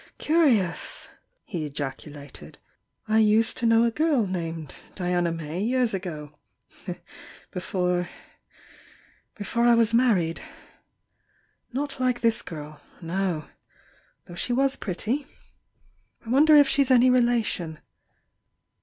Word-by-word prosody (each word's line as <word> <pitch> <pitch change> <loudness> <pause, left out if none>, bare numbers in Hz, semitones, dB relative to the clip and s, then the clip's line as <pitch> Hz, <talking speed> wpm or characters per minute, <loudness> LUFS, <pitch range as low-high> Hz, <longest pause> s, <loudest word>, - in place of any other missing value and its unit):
"Curious!" 270 - +1 0.4
he 175 -7 -4
ejaculated— 145 0 -7 0.5
"I 220 +1 +3
used 220 +1 +3
to 235 - 0
know 230 0 +5
a 235 - +2
gurl 295 -4 +1
named 165 -5 -5 0.2
Diana 175 -2 0
May 165 +1 -5
years 245 +1 +1
ago— 155 -6 -5 1.2
before— 180 -1 -1 1.3
before 235 +3 -1
I 240 -1 +6
was 230 -1 +3
married. 205 -9 +2 1.3
Not 275 +2 -4
like 250 -1 0
this 230 -1 +2
girl 155 -2 -9
— - - -25
no! 170 -2 -2 0.4
— - - -35
though 175 - -12
she 210 +8 -2
was 270 +2 +3
pretty. 220 +9 -3 1.0
I - - -9
wonder 300 +4 +6
if 290 -1 +7
she's 275 -1 +2
any 255 0 +5
relation? 230 -10 +1
210 Hz, 115 wpm, -25 LUFS, 170-245 Hz, 1.3 s, if